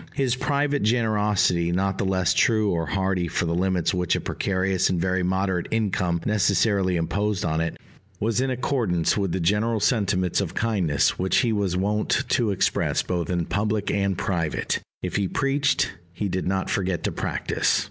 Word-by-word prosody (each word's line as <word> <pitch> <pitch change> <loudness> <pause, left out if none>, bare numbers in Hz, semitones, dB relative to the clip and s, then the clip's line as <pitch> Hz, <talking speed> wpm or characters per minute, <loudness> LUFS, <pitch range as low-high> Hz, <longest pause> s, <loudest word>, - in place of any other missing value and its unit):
His 130 -3 +1
private 145 +2 0
generosity, 105 -6 +2
not 95 +2 0
the - - 0
less 95 -2 +1
true 110 -3 +2
or 85 -2 -1
hearty 95 -2 0
for 85 - -1
the 85 - -1
limits 90 0 +1
which 90 -2 +1
a - - 0
precarious 95 -1 0
and 90 - 0
very 95 +1 0
moderate 95 -1 0
income 95 -6 0
necessarily 100 -2 +2
imposed 100 +5 -1
on 80 -1 0
it, 85 - -3 0.4
was 110 +2 0
in 135 - 0
accordance 120 - 0
with 100 -4 -1
the 95 - -1
general 105 +6 +1
sentiments 100 -6 +1
of 95 - -4
kindness 95 -11 +1
which 95 +1 +1
he 120 -3 +1
was 100 -4 0
wont 105 +3 0
to 120 -5 +2
express 100 - +1
both 85 -2 -2
in 85 -2 0
public 105 +1 -1
and 100 -2 0
private: 85 -5 -1 0.2
if 90 - -2
he 100 -2 0
preached, 140 +5 +1 0.2
he 100 +4 -3
did 95 -1 -2
not 95 0 -1
forget 95 -3 -1
to - - 0
practise. - - 0
95 Hz, 175 wpm, -24 LUFS, 90-105 Hz, 0.4 s, generosity